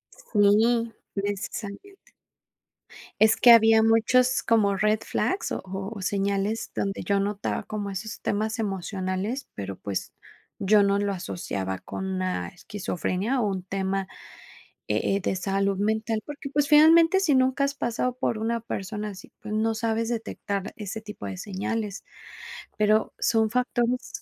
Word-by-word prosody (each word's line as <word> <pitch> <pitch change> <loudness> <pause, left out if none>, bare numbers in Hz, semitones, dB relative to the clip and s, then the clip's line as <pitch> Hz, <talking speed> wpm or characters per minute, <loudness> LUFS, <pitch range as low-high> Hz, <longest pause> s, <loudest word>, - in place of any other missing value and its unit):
Sí, 225 +2 +2 0.2
precisamente. 205 - -5 1.1
Es 220 +1 +6
que 240 - +7
había 225 -1 +7
muchos 245 +3 +3
como 210 -3 +3
red 215 +1 +2
flags 385 - -1
o - - -2
o 195 +2 -5
o 195 - -7
señales 200 +2 -1
donde 195 0 -2
yo 200 -1 +1
notaba 200 +1 -2
como 210 -2 -4
esos 200 +3 -6
temas 215 +3 -1
emocionales, 195 +4 -3
pero, 100 -1 -5
pues, 100 -1 -4 0.5
yo 205 +1 +5
no 200 0 +2
lo 200 0 0
asociaba 95 - -4
con 190 - -6
una 185 - -2
esquizofrenia 205 - -2
o 215 - +1
un 190 -2 -3
tema, 195 +1 -2 0.8
e 195 - +1
eh, - - -4
de 190 - -1
salud 195 +1 0
mental, 220 +1 0
porque, 295 -1 -7
pues, 290 0 +1
finalmente, 325 +4 +7
si 340 -7 +2
nunca 260 +1 +2
has 280 - -1
pasado 245 0 -1
por 230 - 0
una 230 +1 -1
persona 210 -1 -4
así, 190 -2 -11
pues 215 0 -6
no 225 +1 +1
sabes 225 +1 -1
detectar 205 -3 -3
ese 215 +1 -5
tipo 210 - -9
de 95 -2 -6
señales, 205 - -4 0.7
pero 215 +1 +2
son 220 -1 +2
factores 250 +7 -1
215 Hz, 145 wpm, -26 LUFS, 195-230 Hz, 1.1 s, que